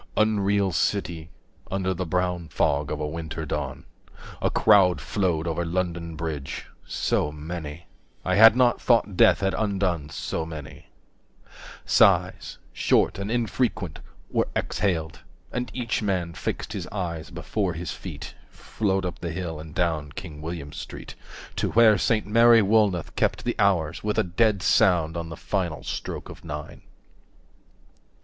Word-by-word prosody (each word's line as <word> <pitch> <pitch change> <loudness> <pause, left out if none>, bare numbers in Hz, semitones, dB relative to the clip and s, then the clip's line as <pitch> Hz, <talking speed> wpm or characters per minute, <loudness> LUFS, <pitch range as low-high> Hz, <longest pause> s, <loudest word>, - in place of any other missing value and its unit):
Unreal 100 -2 +2
City, 85 -2 -1
60 - - -20 0.4
Under 95 -1 0
the 90 0 -4
brown 90 0 -1
fog 70 -1 0
of 75 - -3
a 75 - -1
winter 80 0 -5
dawn, - - -4 0.6
A - - +2
crowd 95 -4 +5
flowed 90 -6 -1
over 85 0 -1
London 85 -1 -2
Bridge, 75 -4 -4 0.2
so 75 - 0
many, 75 +1 -7 0.4
I 95 - +1
had 110 +3 +8
not 125 -1 +3
thought 115 -5 +3
death 95 - +5
had 95 0 +1
undone 95 -8 -1
so 80 - -3
many. 80 -4 -9 1.0
Sighs, - - +3 0.2
short - - +2
and 100 +1 -3
infrequent, 115 - -1 0.3
were - - +1
exhaled, 80 -7 -1 0.3
And 125 0 -3
each 120 -3 -2
man 90 -5 -1
fixed - - -4
his - - -4
eyes 85 -6 -4
before 90 +2 -2
his 85 +1 -5
feet. - - -8 0.2
65 - - -27
Flowed 95 -3 -1
up 90 - -4
the 85 - -4
hill 80 -2 -4
and 80 0 -10
down 80 -5 -1
King 80 -6 -8
William 80 -3 -6
Street, - - -8 0.4
To - - 0
where 110 -3 +6
Saint 110 -2 +1
Mary 115 +1 +6
Woolnoth 100 -4 +2
kept - - 0
the - - 0
hours 85 -4 +2
With 105 0 -1
a - - +4
dead 100 +2 +1
sound 90 -6 +3
on 85 -1 -4
the 80 - -7
final 85 -8 -2
stroke - - -5
of - - -11
nine. 75 -2 -7
90 Hz, 150 wpm, -25 LUFS, 80-100 Hz, 1.0 s, had